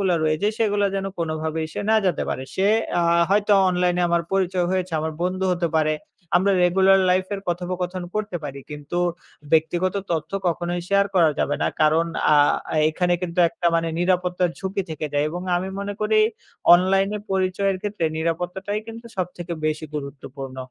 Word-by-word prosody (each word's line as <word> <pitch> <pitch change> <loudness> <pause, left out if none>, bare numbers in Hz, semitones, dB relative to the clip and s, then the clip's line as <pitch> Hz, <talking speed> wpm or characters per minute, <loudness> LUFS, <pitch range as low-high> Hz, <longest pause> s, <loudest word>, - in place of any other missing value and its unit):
গুলো 190 -2 +2
রয়েছে 155 +6 +1
সেগুলো 205 -2 +2
যেন 195 0 -2
কোনোভাবেই 160 -1 -2
সে - - -3
না 220 - +5
জানতে 185 - +1
পারে। 130 - -3
সে 190 +1 +2 0.3
আ - - +2 0.3
হয়তো 205 +1 +3 0.2
অনলাইনে 180 0 +1
আমার 170 0 +2
পরিচয় 185 -2 +1
হয়েছে, 185 -2 -1
আমার 160 0 -2
বন্ধু 185 +1 -1
হতে 170 -1 0
পারে, 155 -1 +2 0.4
আমরা 195 +2 +3
regular 190 +2 +5
life 185 +1 +1
এর 195 - -5
কথোপকথন 180 +1 -3
করতে 210 -4 -2
পারি 140 -1 -6
কিন্তু, 150 +3 -6 0.6
ব্যক্তিগত 175 +4 +2 0.2
তথ্য 155 -1 -2 0.2
কখনোই 175 +1 -1
share 200 0 +3
করা 165 -4 +5
যাবে 145 - +1
না। - - +2
কারণ 160 +2 +4 0.3
আ - - +7 0.6
এখানে 175 +2 +1
কিন্তু 175 0 -4
একটা 170 +1 -3
মানে 165 0 +1
নিরাপত্তার 180 0 +1
ঝুঁকি 195 +1 -2
থেকে 155 0 -3
যায়। 145 +1 +1
এবং 175 +2 -5
আমি 185 +2 -2
মনে 200 0 -3
করি 215 0 +2 0.6
অনলাইনে 195 +3 +2
পরিচয়ের 190 +1 +1
ক্ষেত্রে 205 -5 -2
নিরাপত্তাটাই 180 +5 -2
কিন্তু 230 +1 -9
সবথেকে 175 -1 -4
বেশি 155 +1 -2
গুরুত্বপূর্ণ। 140 -2 -7
180 Hz, 165 wpm, -23 LUFS, 160-190 Hz, 0.6 s, আ